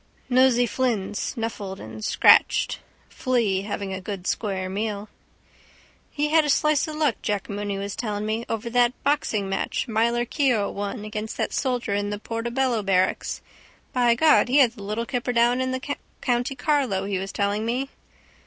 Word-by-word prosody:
Nosey 250 -1 +5
Flynn 235 -6 -1
snuffled 205 -4 -4
and 110 0 -9
scratched. - - +4 0.3
Flea 230 -7 0
having 200 -1 -4
a 190 - -5
good 190 -1 -6
square 190 -4 -2
meal. 205 +1 -3 1.0
—He 295 +1 -1
had 320 +1 +5
a - - -2
good 285 - +5
slice 305 -1 +2
of 310 - -5
luck, 300 -6 +1
Jack 205 -1 -2
Mooney 205 -1 -3
was 200 0 -4
telling 210 -3 -3
me, 220 +2 -1
over 225 +1 -3
that 245 0 +3
boxingmatch 215 -9 0
Myler 235 +2 +1
Keogh 245 -6 +1
won 205 +2 -4
again 215 0 -4
that - - -1
soldier 245 -6 -1
in 205 0 -1
the 205 - -3
Portobello 235 +2 -1
barracks. 185 -2 0 0.5
By 240 -2 +3
God, 310 +2 +5
he 265 - +3
had 260 -5 +6
the 230 -3 -13
little 215 +4 -3
kipper 245 0 -2
down 240 +2 +3
in 260 - 0
the 260 +2 -3 0.2
county 245 +1 0
Carlow 255 -8 0
he 195 -2 -1
was 195 +1 -5
telling 205 +1 0
me... 255 +4 -2
230 Hz, 170 wpm, -24 LUFS, 200-255 Hz, 1.0 s, had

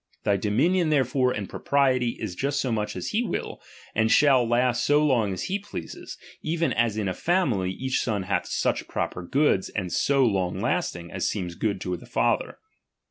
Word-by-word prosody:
Thy 100 -2 +2
dominion 155 - +2
therefore, 130 -3 +2
and 100 -5 -3
propriety, 130 -4 +1
is 105 -5 -4
just 140 +9 -1
so 130 -3 -1
much 105 -2 -2
as - - -4
he 220 - +1
will, 245 - -4 0.3
and 110 0 +2
shall 135 -4 +5
last 120 +1 +2
so 150 +1 +3
long 120 -8 +2
as 95 - -4
he 195 +2 -1
pleases; 190 - -8 0.2
even 165 +1 0
as 115 -2 +1
in 105 -2 -1
a 95 - -1
family, 130 - +1
each 130 +8 -1
son 105 -4 -1
hath 95 +2 -1
such - - -1
proper 90 - -3
goods, 115 - +1
and 90 -5 -4
so 140 +7 +3
long 95 -5 0
lasting, 85 0 -2
as 95 - -1
seems 90 -5 -3
good 100 +2 -1
to 90 -1 -2
the - - -14
father. - - 0
115 Hz, 190 wpm, -25 LUFS, 100-140 Hz, 0.3 s, shall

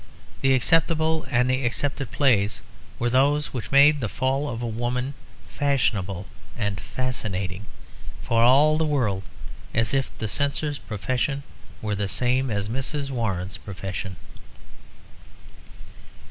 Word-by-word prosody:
The 135 -1 +4
acceptable 160 +3 +2
and 125 +1 +3
the 130 +1 +1
accepted 135 +1 -1
plays 110 -5 +2 0.3
were 120 0 0
those 145 +4 +2
which 125 -4 -4
made 145 +1 +6
the 110 - -1
fall 135 +5 0
of 115 -1 -4
a - - -1
woman 120 +4 -2 0.3
fashionable 105 -10 0 0.3
and 100 -5 -2
fascinating; 100 -5 -3 0.6
for 115 -1 +2
all 145 +6 +5
the - - +2
world 115 -10 +1 0.5
as 115 +1 +2
if 135 -2 +1
the 110 - -2
Censor's 145 +4 -1
profession 130 +6 -2 0.4
were 105 -1 -1
the 100 0 -1
same 125 +5 +1
as 100 -2 -1
Mrs. 135 +4 -2
Warren's 95 -7 -2
profession. 95 -1 -6
125 Hz, 125 wpm, -25 LUFS, 105-140 Hz, 0.6 s, made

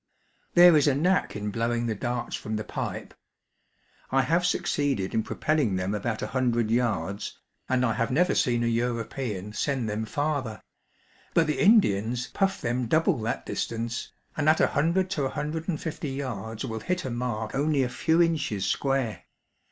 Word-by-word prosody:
There 175 -1 +9
is 150 -1 +4
a 140 - +3
knack.in 140 - 0
blowing 120 +2 0
the 115 - 0
darts 120 +4 -3
from 110 - -4
the 110 - -2
pipe. - - -5 1.0
I 135 0 +3
have 170 +6 +2
succeeded 140 - 0
in 110 - +2
propelling 150 -4 0
them 95 +2 -1
about 110 +1 -2
a - - -2
hundred 120 -4 +1
yards, 105 -6 -1 0.3
and 130 -1 +2
I 115 - +1
have 115 +3 -1
never 175 +8 +2
seen 120 -1 +2
a - - +1
European 115 -3 -2
send 130 +1 -1
them 110 +1 -2
farther; 140 -4 -2 0.7
but 165 - +5
the 150 -2 -1
Indians 125 - +4
puff 195 0 0
them 120 0 -1
double 160 - +2
that 110 - -2
distance, 115 +1 -3 0.2
and 155 0 +2
at 155 - +4
a - - +4
hundred 180 +4 +1
to 150 -8 0
a - - 0
hundred 155 +3 -4
and 155 - -1
fifty 155 -2 -4
yards 115 -4 -4
will 110 -3 -4
hit 180 +7 -2
a 130 - -3
mark 120 -3 -3
only 145 0 +2
a - - 0
few 160 +7 +3
inches 145 - 0
square. 135 -8 -1
125 Hz, 175 wpm, -27 LUFS, 110-150 Hz, 1.0 s, There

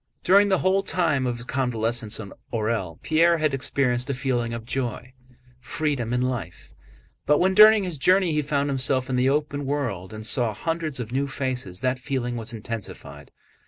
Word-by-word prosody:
During 200 +3 +5
the 190 - +3
whole 190 +2 +2
time 160 -8 0
of 120 - -1
his 120 - -9
convalescence 120 -4 0
in 100 -3 -8 0.2
Orël 110 -7 -2
Pierre 165 +2 +3
had 155 -3 0
experienced 130 -2 0
a 140 - -1
feeling 125 -3 -1
of 115 -1 -6
joy, 125 0 -4 0.5
freedom, 140 -4 -2
and 125 +1 +1
life; 115 -10 -6 0.5
but 150 - +5
when 190 +4 +2
during 215 +1 +8
his 175 -6 -4
journey 185 +3 +3
he 150 - +1
found 140 -1 -1
himself 130 -1 0
in - - 0
the 125 +1 +3
open 145 0 -1
world 130 -10 -3
and 110 0 -6
saw 115 -2 +1
hundreds 160 +1 -3
of 120 -2 -5
new 135 +2 0
faces, 125 -9 -4
that 130 0 0
feeling 125 -2 -3
was 115 -2 -2
intensified. 105 - -7
130 Hz, 180 wpm, -24 LUFS, 115-150 Hz, 0.5 s, during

